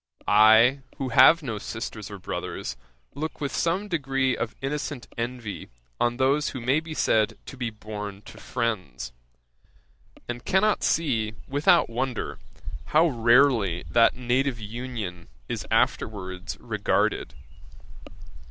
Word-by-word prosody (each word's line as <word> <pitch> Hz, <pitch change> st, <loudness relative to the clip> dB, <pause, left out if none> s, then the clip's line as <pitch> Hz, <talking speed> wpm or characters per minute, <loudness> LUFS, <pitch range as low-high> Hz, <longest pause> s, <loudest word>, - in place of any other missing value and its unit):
I, 110 Hz, +6 st, +6 dB, 0.2 s
who 135 Hz, -2 st, -3 dB
have 160 Hz, +7 st, +7 dB
no 115 Hz, -6 st, -3 dB
sisters 110 Hz, -2 st, -6 dB
nor 100 Hz, -, -7 dB
brothers, 80 Hz, -8 st, -5 dB, 0.4 s
look 155 Hz, +3 st, -5 dB
with 140 Hz, -2 st, -3 dB
some 180 Hz, +5 st, 0 dB
degree 135 Hz, -7 st, 0 dB
of 115 Hz, -, -4 dB
innocent 140 Hz, -1 st, -4 dB
envy 120 Hz, -3 st, -5 dB, 0.3 s
on 120 Hz, 0 st, +1 dB
those 140 Hz, +3 st, +2 dB
who 130 Hz, -, -6 dB
may 130 Hz, +5 st, +2 dB
be 160 Hz, 0 st, -8 dB
said 110 Hz, -6 st, +2 dB
to -, -, -9 dB
be 125 Hz, -3 st, -3 dB
born 105 Hz, -2 st, -7 dB
to -, -, -12 dB
friends; 95 Hz, -, -3 dB, 1.2 s
and 120 Hz, 0 st, -5 dB
cannot 210 Hz, +3 st, +2 dB
see, 115 Hz, -9 st, +1 dB
without 145 Hz, +5 st, +4 dB
wonder, 125 Hz, -, -3 dB, 0.5 s
how 160 Hz, -, +4 dB
rarely 115 Hz, -, +3 dB
that 115 Hz, +6 st, +5 dB
native 125 Hz, +1 st, 0 dB
union 110 Hz, -5 st, -6 dB, 0.2 s
is -, -, -4 dB
afterwards 95 Hz, -4 st, -1 dB
regarded. 65 Hz, -, 0 dB
120 Hz, 125 wpm, -26 LUFS, 110-140 Hz, 1.2 s, have